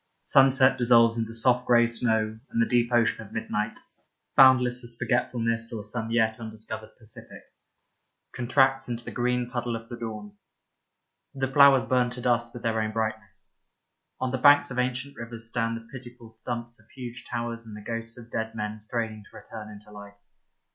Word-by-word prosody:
Sunset 135 -1 +5
dissolves 115 -1 +5
into 115 -1 -3
soft 125 +2 +2
grey 120 -1 +5
snow 110 -2 0
and - - -2
the 115 - +4
deep 120 0 +1
ocean 115 -2 +2
of 100 - -15
midnight, 105 0 -3 0.6
boundless 125 -2 +5
as 120 -1 -5
forgetfulness 115 -2 -1
or 110 -3 -5
some 110 +2 -4
yet 110 -1 +1
undiscovered 110 -1 -8
Pacific, 110 -2 -12 0.9
contracts 135 +2 +2
into 120 0 -4
the - - -6
green 125 0 -1
puddle 120 -1 -3
of 115 0 -8
the 120 - -6
dawn. 105 -3 -7 1.0
The 135 -1 -2
flowers 140 -1 +6
burn 125 -1 +2
to 125 0 -6
dust 120 -1 +1
with 120 - -10
their 110 -1 0
own 110 0 -3
brightness. 110 -2 -5 0.7
On 130 0 -1
the 130 - -2
banks 145 +1 +6
of 125 - -3
ancient 125 +2 -2
rivers 115 -1 -8
stand 115 -1 -2
the 115 0 -13
pitiful 120 -3 -11
stumps 120 +1 -6
of 110 0 -24
huge 125 -2 -8
towers 115 -1 -4
and 105 -1 -9
the - - -10
ghosts 115 0 -4
of 120 -1 -13
dead 110 0 -3
men 105 0 -4
straining 110 -1 -4
to - - -14
return 110 -2 -10
into 105 0 -13
life. 100 0 -12
115 Hz, 175 wpm, -26 LUFS, 110-125 Hz, 1.0 s, flowers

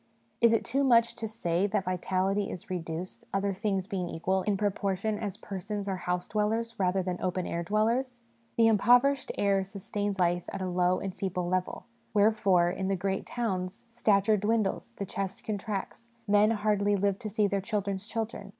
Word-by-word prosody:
Is 235 -1 +6
it 225 - +2
too 275 +4 +1
much 235 -3 +4
to 220 - -3
say 195 -4 0
that 205 -1 0
vitality 190 +2 0
is 180 - -8
reduced, 170 0 -5
other 195 0 0
things 195 -1 -1
being 185 -4 -3
equal, 190 +3 0
in 200 0 0
proportion 205 +1 -1
as 205 -2 -4
persons 200 +1 -5
are 190 -1 -1
house 180 0 -2
dwellers 225 +2 0
rather 185 0 +2
than 180 -1 -3
open 185 0 -1
air 170 - -2
dwellers? 235 +6 0 0.3
The 230 -1 +6
im 220 -2 +4
poverished 245 +5 +4
air 200 -1 +2
sustains 200 +1 -4
life 175 0 +2
at 195 - -5
a 190 - -2
low 180 0 +2
and 195 -1 -4
feeble 180 -2 -2
level; 185 0 -2 0.3
wherefore, 200 -4 +4
in 190 +1 -3
the 195 - +1
great 190 +1 -2
towns, 190 -6 -3
stature 215 -2 +3
dwindles, 210 0 0
the 200 - -3
chest 195 0 -4
contracts, 210 +2 -4 0.2
men 205 +1 +5
hardly 205 -2 +2
live 200 0 +1
to 215 - -5
see 210 0 +1
their 200 -1 0
children's 200 -1 -2
children. 220 -2 -4
200 Hz, 180 wpm, -29 LUFS, 185-215 Hz, 0.3 s, Is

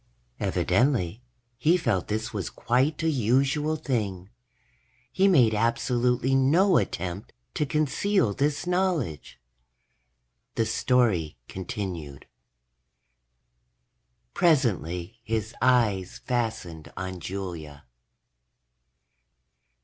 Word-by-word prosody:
Evidently, 120 -6 +1 0.4
he 165 +7 +4
felt 115 - 0
this 110 +1 -3
was 100 -4 -3
quite 135 +7 0
a - - +2
usual 140 +5 +1
thing. 105 - -3 0.8
He 195 +1 +3
made 130 - +5
absolutely 125 +3 +1
no 165 +9 +4
attempt 90 +3 -3 0.2
to 150 - -1
conceal 155 - +1
this 145 - -1
knowledge. 180 - -1 1.2
The 115 - +1
story 110 - +1
continued: 95 - -6 2.1
_... - - -51
presently 115 - +1
his 110 0 -2
eyes 110 -7 +2
fastened 110 - -3
on 95 -1 -5
Julia. 85 -6 -6
115 Hz, 85 wpm, -26 LUFS, 95-140 Hz, 2.1 s, made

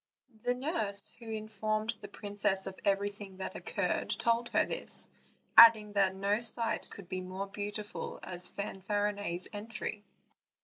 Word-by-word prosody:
The 245 +2 +1
nurse 235 - +1
who 230 -2 -9
informed 215 0 -1
the 205 - -7
princess 200 -1 -2
of 190 -1 -6
everything 200 -1 -1
that 190 - -5
occurred - - -1
told 235 +1 +1
her - - +3
this, - - -3 0.5
adding 220 -2 +9
that 195 -2 +3
no 200 +2 +1
sight 230 -1 0
could 200 -3 -10
be 185 0 -3
so 185 +2 -4
beautiful 205 +1 -5
as 180 -1 -4
Fanfarinet's 200 -2 -2
entry. 210 0 -4
205 Hz, 135 wpm, -32 LUFS, 195-215 Hz, 0.5 s, adding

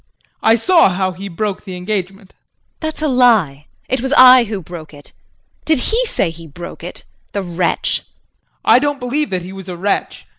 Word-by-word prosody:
I 225 - +5
saw 330 - +4
how 185 0 -1
he 190 +3 -8
broke 200 +2 -3
the 185 -3 -7
engagement. 195 +1 -4
JULIE. - - -40 0.4
That's 315 -1 -5
a - - +2
lie. 220 - +3 0.2
It 260 -1 -1
was 265 +1 -3
I 255 -1 +8
who 210 -2 -4
broke 160 -3 -10
it. 145 - -14 0.5
Did 315 -1 +2
he 455 - +1
say 320 - -1
he 165 0 -12
broke 170 +3 -10
it 175 - -8 0.3
the 200 - -2
wretch! 175 -1 0
JEAN. - - -14 0.6
I - - +6
don't 290 0 -1
believe 280 +5 -2
that 185 -2 -3
he 185 +2 -9
was 190 -1 -9
a 175 - -6
wretch. 200 +3 -2
200 Hz, 195 wpm, -17 LUFS, 180-255 Hz, 0.6 s, I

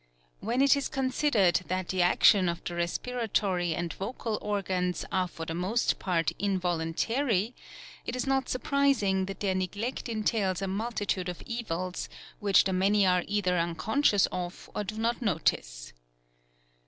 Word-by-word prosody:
When 240 +5 +1
it 280 +1 +6
is 280 - -2
considered 260 -8 +2
that 185 0 -2
the 185 -1 +1
action 180 +1 +5
of 170 - -4
the 175 - -4
respiratory 185 -1 -1
and 175 -1 -3
vocal 220 +1 -4
organs 185 -3 -1
are 185 -2 +1
for 165 -2 -7
the 160 - -4
most 190 +8 0
part 170 -3 0
involuntary, 195 - 0 0.5
it - - -4
is 255 - -2
not 270 -1 0
surprising 255 -8 +1
that 195 - -7
their 195 -2 +1
neglect 200 +7 -3
entails 215 -4 0
a 195 - -2
multitude 200 -2 -2
of 175 - -7
evils, 185 -7 -4 0.3
which 200 -2 +5
the 190 - -1
many 195 +2 +3
are 180 -1 +3
either 185 -4 +1
unconscious 195 - +2
of 180 -1 -6
or 210 - -2
do 215 +2 -6
not 235 +3 0
notice. - - -1
195 Hz, 150 wpm, -29 LUFS, 180-230 Hz, 0.5 s, it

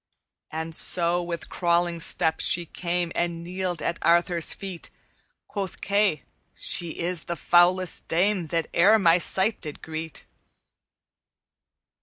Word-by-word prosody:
"And 160 +1 -5
so 175 +2 +1
with 170 -1 -5
crawling 175 -1 0
step 160 0 0
she 175 0 +1
came 175 0 -3
And 170 -1 -2
kneeled 180 -1 -4
at 170 - -2
Arthur's 170 0 +2
feet; 190 -4 -7 0.6
Quoth 195 -3 -5
Kay, 200 -6 +1 0.3
'She 170 -2 +1
is 175 -1 -2
the 170 - -3
foulest 175 +2 +2
dame 180 +1 +1
That 165 +1 -1
e'er 200 +6 +6
my 175 -4 +4
sight 195 +5 0
did 150 -3 -8
greet.' 160 0 -6
175 Hz, 125 wpm, -25 LUFS, 165-185 Hz, 0.6 s, e'er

